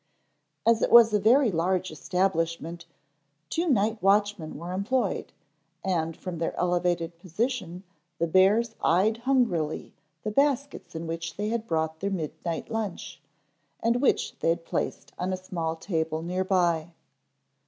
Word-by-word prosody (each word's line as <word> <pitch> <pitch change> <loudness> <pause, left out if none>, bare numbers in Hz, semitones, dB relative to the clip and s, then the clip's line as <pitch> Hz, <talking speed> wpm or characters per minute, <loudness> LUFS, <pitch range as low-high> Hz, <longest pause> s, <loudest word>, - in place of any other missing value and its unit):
As 230 -1 +4
it - - +2
was 230 -2 +8
a 210 - +4
very 235 +3 +5
large 180 +1 0
establishment 170 0 -1 0.6
two 335 +1 0
night 220 -3 +2
watchmen 200 -4 +2
were 170 +4 -6
employed, 205 +2 -1 0.5
and 165 -4 -1
from 180 -3 -6
their 165 - -2
elevated 175 -1 0
position 185 0 -3 0.3
the 170 - +1
bears 195 +7 +4
eyed 195 +7 +3
hungrily 230 - 0 0.3
the 215 - -2
baskets 280 - 0
in 165 +1 -4
which 165 0 -5
they 210 +1 -1
had 230 0 -2
brought 160 -1 -1
their 200 - -1
midnight 165 -2 -4
lunch, 220 -4 -4 0.6
and 235 +2 +1
which 280 - +1
they - - +1
had 165 0 0
placed - - -3
on 180 +1 -1
a - - -1
small 170 -3 -3
table 160 -2 -2
near 180 +2 -1
by. 175 -3 +1
185 Hz, 145 wpm, -27 LUFS, 165-220 Hz, 0.6 s, was